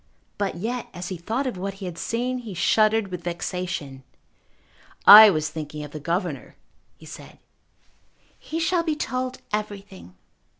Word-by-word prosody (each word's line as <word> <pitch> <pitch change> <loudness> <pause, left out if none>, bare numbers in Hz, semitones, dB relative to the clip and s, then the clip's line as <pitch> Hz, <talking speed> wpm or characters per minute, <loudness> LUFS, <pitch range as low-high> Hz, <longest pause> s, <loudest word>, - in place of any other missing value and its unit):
But 200 -2 -1
yet, 230 +7 -4
as 180 +1 -6
he 185 - -4
thought 225 +11 -3
of 245 -8 -4
what 195 +1 -4
he 195 -1 -8
had 175 -2 -6
seen, 250 +6 -2
he 220 -6 -8
shuddered 215 +3 +2
with 180 -2 -7
vexation. 175 -5 -4 1.0
"I 215 +1 +12
was 155 -5 -1
thinking 150 -1 -6
of 145 - -9
the 155 - -7
governor," 170 0 -3 0.4
he - - -16
said. - - -12 1.0
"He 325 - -5
shall 335 +1 +1
be 320 -2 -1
told 255 -3 -4
everything." 200 - -6
195 Hz, 155 wpm, -24 LUFS, 170-230 Hz, 1.0 s, I